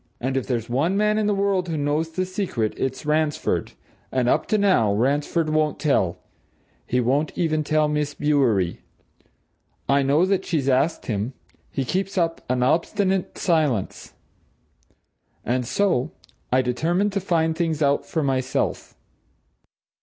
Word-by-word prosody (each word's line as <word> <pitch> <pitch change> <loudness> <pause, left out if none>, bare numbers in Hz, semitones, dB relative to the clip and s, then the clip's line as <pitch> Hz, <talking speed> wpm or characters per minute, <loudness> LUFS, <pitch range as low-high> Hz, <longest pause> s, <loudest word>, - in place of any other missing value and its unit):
And 130 +2 -2
if 135 - -1
there's 120 -3 -2
one 155 +11 0
man 210 +1 +2
in 210 - +1
the 205 - +2
world 195 -2 0
who 160 - -2
knows 150 +3 0
the 185 +3 -2
secret, 185 - -2
it's 130 0 -3
Ransford. 150 0 0 0.4
And, 130 -2 +1
up - - +2
to 215 - +2
now, 185 - +3
Ransford 145 +7 0
won't 155 -1 +1
tell 110 - +1 0.7
he 125 - +1
won't 135 +5 0
even 155 -3 +1
tell 155 0 +2
Miss 150 -1 -1
Bewery. 125 - +1 1.1
I 140 +1 +3
know 140 +6 +3
that 190 0 +1
she's 155 -7 -1
asked 140 +5 +1
him 110 +3 -2 0.4
he 135 - -3
keeps 190 +8 -2
up 165 -2 0
an 125 0 +1
obstinate 185 +6 0
silence. 155 - 0 1.3
And 125 +1 -1
so 175 -8 +1 0.4
I 130 +1 +3
determined 170 +11 0
to 200 - 0
find 165 -4 0
things 160 -2 0
out 140 0 +2
for 160 - -2
myself." 130 -1 -1
150 Hz, 145 wpm, -23 LUFS, 130-175 Hz, 1.3 s, now